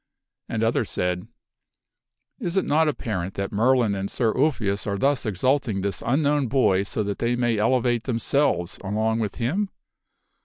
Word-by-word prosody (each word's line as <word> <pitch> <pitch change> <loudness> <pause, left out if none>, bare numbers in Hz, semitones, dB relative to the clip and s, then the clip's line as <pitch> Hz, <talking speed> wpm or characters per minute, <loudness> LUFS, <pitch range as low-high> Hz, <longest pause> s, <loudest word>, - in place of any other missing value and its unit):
are - - -6
angry. 115 0 +1
^^ - - +3
others 115 -1 0
said, 90 0 -2 0.6
" - - -61 0.3
Is 175 +2 -2
it 190 - +2
not 155 +2 +3
apparent 95 -10 -3
that 100 0 -3
Merlin 120 0 +3
and 100 0 -3
Sir 115 -3 0
Ulfius 115 -9 0
are 100 -1 -1
thus 135 +2 +1
exalting 110 +1 0
this 100 0 -2
unknown 145 +2 +1
boy 110 -7 +3
so 105 +2 -2
that 100 -1 -3
they 120 +1 +1
may 120 -3 +1
elevate 120 +1 +1
them 125 -4 -1
selves 115 -9 0
along 110 +3 0
with 105 -3 -2
him?" 180 - -1
115 Hz, 180 wpm, -24 LUFS, 100-130 Hz, 0.6 s, ^^